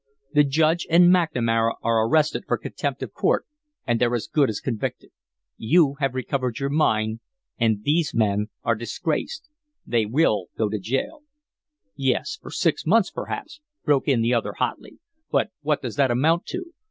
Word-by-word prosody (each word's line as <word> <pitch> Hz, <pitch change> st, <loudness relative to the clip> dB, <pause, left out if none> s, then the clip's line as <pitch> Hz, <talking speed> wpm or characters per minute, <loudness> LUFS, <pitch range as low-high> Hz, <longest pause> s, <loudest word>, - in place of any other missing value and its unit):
The 150 Hz, -1 st, +6 dB
Judge 155 Hz, +4 st, +1 dB
and 175 Hz, +2 st, +6 dB
McNamara 115 Hz, -10 st, +1 dB
are 115 Hz, -1 st, +2 dB
arrested 155 Hz, +2 st, +2 dB
for -, -, +1 dB
contempt -, -, -4 dB
of -, -, -7 dB
court -, -, +1 dB, 0.4 s
and 120 Hz, -2 st, 0 dB
they're 120 Hz, 0 st, +2 dB
as 115 Hz, -, -2 dB
good 145 Hz, -4 st, +2 dB
as 105 Hz, -, -3 dB
convicted; 110 Hz, -, -4 dB, 0.5 s
you 145 Hz, +4 st, +3 dB
have 135 Hz, -3 st, 0 dB
recovered 130 Hz, -2 st, -2 dB
your 140 Hz, 0 st, -2 dB
mine, 110 Hz, -7 st, +1 dB, 0.4 s
and 110 Hz, -3 st, +1 dB
these 155 Hz, +3 st, +1 dB
men 105 Hz, -2 st, +1 dB, 0.2 s
are 115 Hz, -, +2 dB
disgraced. 160 Hz, -, -3 dB, 0.4 s
They 115 Hz, -3 st, +1 dB
will 110 Hz, -, +2 dB
go 110 Hz, -2 st, +1 dB
to 105 Hz, 0 st, -2 dB
jail 135 Hz, -, -3 dB, 0.4 s
" -, -, -68 dB, 0.3 s
"Yes, 135 Hz, -, -1 dB
for -, -, -10 dB
six 165 Hz, -5 st, 0 dB
months, 200 Hz, +4 st, +3 dB
perhaps," 295 Hz, -, -6 dB, 0.2 s
broke 145 Hz, -2 st, +2 dB
in 125 Hz, -5 st, +3 dB
the 120 Hz, +2 st, +2 dB
other, 115 Hz, -, 0 dB
hotly, -, -, -4 dB, 0.3 s
"but -, -, +1 dB
what 150 Hz, -1 st, 0 dB
does 120 Hz, -1 st, -5 dB
that 140 Hz, -2 st, +3 dB
amount 155 Hz, +8 st, +2 dB
to? 355 Hz, -1 st, -6 dB
135 Hz, 170 wpm, -24 LUFS, 115-160 Hz, 0.5 s, The